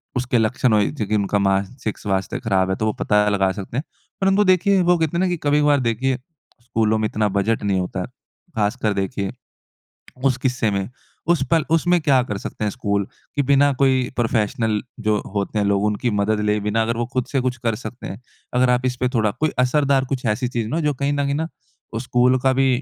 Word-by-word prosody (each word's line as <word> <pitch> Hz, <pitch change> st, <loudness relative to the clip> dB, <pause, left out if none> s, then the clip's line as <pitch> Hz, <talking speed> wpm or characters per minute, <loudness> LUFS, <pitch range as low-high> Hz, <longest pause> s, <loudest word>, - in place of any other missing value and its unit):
उसके 125 Hz, 0 st, 0 dB
लक्षण 115 Hz, +1 st, +2 dB
हो 105 Hz, -, +4 dB
जो 110 Hz, -2 st, -2 dB
की 105 Hz, -, 0 dB
उनका 100 Hz, 0 st, +1 dB
मानसिक 100 Hz, +4 st, -2 dB
स्वास्थ्य 95 Hz, -2 st, -2 dB
ख़राब 95 Hz, -6 st, +1 dB
है 95 Hz, -, +1 dB
तो 110 Hz, -, -2 dB
वो 110 Hz, -, +1 dB
पता 105 Hz, 0 st, +3 dB
लगा 95 Hz, -2 st, +2 dB
सकते 115 Hz, -, -7 dB
हैं। 140 Hz, -, -1 dB, 0.4 s
परंतु 195 Hz, +2 st, +4 dB
देखिए 190 Hz, +1 st, +2 dB
वो 175 Hz, 0 st, +3 dB
कहते 160 Hz, +1 st, 0 dB
है -, -, +1 dB
ना 190 Hz, -, +2 dB
कि 175 Hz, -1 st, -1 dB
कभी-कभार 145 Hz, 0 st, +4 dB
देखिए 130 Hz, +3 st, 0 dB, 0.4 s
स्कूलों 110 Hz, -3 st, +1 dB
में 110 Hz, -, 0 dB
इतना 105 Hz, 0 st, 0 dB
बजट 110 Hz, +3 st, 0 dB
नहीं 100 Hz, -2 st, +1 dB
होता 90 Hz, +1 st, -3 dB
है। -, -, -4 dB, 0.5 s
ख़ासकर 105 Hz, 0 st, 0 dB
देखिए, 100 Hz, 0 st, -2 dB, 0.9 s
उस 130 Hz, -2 st, +3 dB
किस्से 120 Hz, -4 st, 0 dB
में 100 Hz, -1 st, -1 dB, 0.4 s
उस 170 Hz, -, +2 dB
पर 165 Hz, -1 st, +4 dB
उसमें 175 Hz, +2 st, +3 dB
क्या 135 Hz, -4 st, +4 dB
कर 105 Hz, -, -2 dB
सकते 105 Hz, -, -6 dB
हैं 105 Hz, -, 0 dB
स्कूल? 100 Hz, -5 st, -1 dB, 0.3 s
कि 145 Hz, -, +2 dB
बिना 140 Hz, +1 st, +5 dB
कोई 130 Hz, -2 st, +3 dB
प्रोफेशनल 110 Hz, -2 st, 0 dB, 0.2 s
जो 110 Hz, -, +3 dB, 0.2 s
होते 100 Hz, +1 st, -1 dB
हैं 105 Hz, -, +1 dB
लोग 100 Hz, 0 st, +1 dB
उनकी 105 Hz, +3 st, 0 dB
मदद 105 Hz, +1 st, +1 dB
ले 105 Hz, 0 st, +2 dB
बिना 110 Hz, +2 st, +1 dB
अगर 115 Hz, +1 st, -1 dB
वो 120 Hz, -, 0 dB
ख़ुद 125 Hz, -2 st, 0 dB
से 135 Hz, -, +1 dB
कुछ 125 Hz, -1 st, -1 dB
कर 115 Hz, -2 st, +1 dB
सकते 125 Hz, -, -7 dB
हैं, 100 Hz, +6 st, -8 dB, 0.3 s
अगर 125 Hz, 0 st, +3 dB
आप 125 Hz, +1 st, +2 dB
इसपे 125 Hz, 0 st, 0 dB
थोड़ा 110 Hz, -3 st, +2 dB
कोई 155 Hz, 0 st, +2 dB
असरदार 135 Hz, +1 st, +2 dB
कुछ 135 Hz, -2 st, -3 dB
ऐसी 115 Hz, +3 st, 0 dB
चीज़ 120 Hz, -3 st, -2 dB
ना -, -, -2 dB
हो 165 Hz, -, 0 dB
जो 145 Hz, -, 0 dB
कहीं 140 Hz, +2 st, -1 dB
न 145 Hz, 0 st, 0 dB
कहीं 140 Hz, -, 0 dB
ना 160 Hz, +2 st, -1 dB, 0.5 s
वो 115 Hz, -, -2 dB
स्कूल 125 Hz, +1 st, +2 dB
का 130 Hz, -, +4 dB
भी 135 Hz, -, +4 dB
120 Hz, 225 wpm, -21 LUFS, 105-135 Hz, 0.9 s, बिना